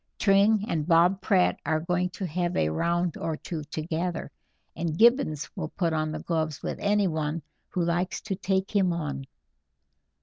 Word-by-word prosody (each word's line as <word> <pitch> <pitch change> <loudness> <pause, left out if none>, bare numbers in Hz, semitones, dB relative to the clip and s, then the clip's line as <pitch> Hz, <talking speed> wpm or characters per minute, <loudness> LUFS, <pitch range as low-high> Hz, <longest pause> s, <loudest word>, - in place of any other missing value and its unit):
Tring 200 +1 +4
and 155 -2 -1
Bob 175 +3 +4
Pratt 190 -3 +2
are 155 -1 +1
going 180 +2 0
to 185 +2 -5
have 175 +1 -1
a 75 - +2
round 170 - 0
or 160 -2 -3
two 160 -2 -5
together, 160 +3 -3 0.4
and 165 -1 -2
Gibbons 225 - +4
will 155 - -4
put 170 -3 -1
on 155 0 0
the 155 - -3
gloves 155 -3 -2
with - - -3
anyone 165 -7 0 0.3
who 180 - -1
likes 175 +2 0
to 205 -3 -3
take 190 +1 -1
him 185 -3 +3
on." 145 -5 -4
170 Hz, 165 wpm, -27 LUFS, 155-190 Hz, 0.4 s, Tring